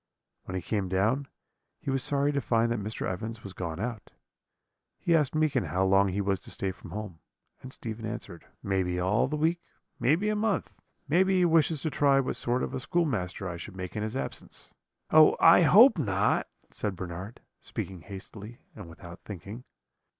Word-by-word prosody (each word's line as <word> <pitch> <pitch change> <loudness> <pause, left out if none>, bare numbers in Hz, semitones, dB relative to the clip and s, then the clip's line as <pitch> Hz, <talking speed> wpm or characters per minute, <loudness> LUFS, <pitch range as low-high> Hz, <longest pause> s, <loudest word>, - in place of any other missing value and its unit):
"When 95 - -6
he 95 - -3
came 100 -4 -1
down, 110 +9 +1 0.5
he 145 -4 -3
was 135 -1 0
sorry 140 0 +1
to 140 -1 -1
find 115 -1 +1
that 120 - 0
Mr. 110 +2 -4
Evans 110 +5 -5
was 100 - -8
gone 85 -3 -5
out. 110 -1 -4 0.9
He 170 - +2
asked 150 -2 +1
Meekin 155 -5 +1
how 95 +1 0
long 95 +1 +4
he 95 +2 -1
was 100 -1 0
to - - -9
stay 95 - -1
from 90 - -12
home; 105 -6 -6 0.4
and 130 - -9
Stephen 110 -3 -5
answered: 100 -6 -7 0.2
"'Maybe 95 -2 0
all 95 +7 +2
the 150 - -2
week; 165 +3 +1 0.4
maybe 165 +10 +2
a 215 - +1
month; 210 -1 -1 0.3
maybe 185 +5 +3
he 180 - +4
wishes 160 -3 +2
to 160 - -1
try 140 -1 +4
what 135 - -1
sort 125 +1 0
of - - -4
a - - -2
schoolmaster 125 - -1
I 85 -1 -5
should 95 +3 -9
make 90 -1 -6
in 105 - -2
his 110 +4 -3
absence.' - - -7 0.4
"'Oh! 155 0 +7
I 165 - +7
hope 205 - +7
not,' 100 -6 +1 0.2
said 105 -2 -3
Bernard, 90 +4 -7 0.2
speaking 95 -3 -6
hastily 100 +6 -9 0.2
and 85 - -10
without 85 +1 -11
thinking. 105 +5 -8
110 Hz, 185 wpm, -28 LUFS, 95-145 Hz, 0.9 s, Oh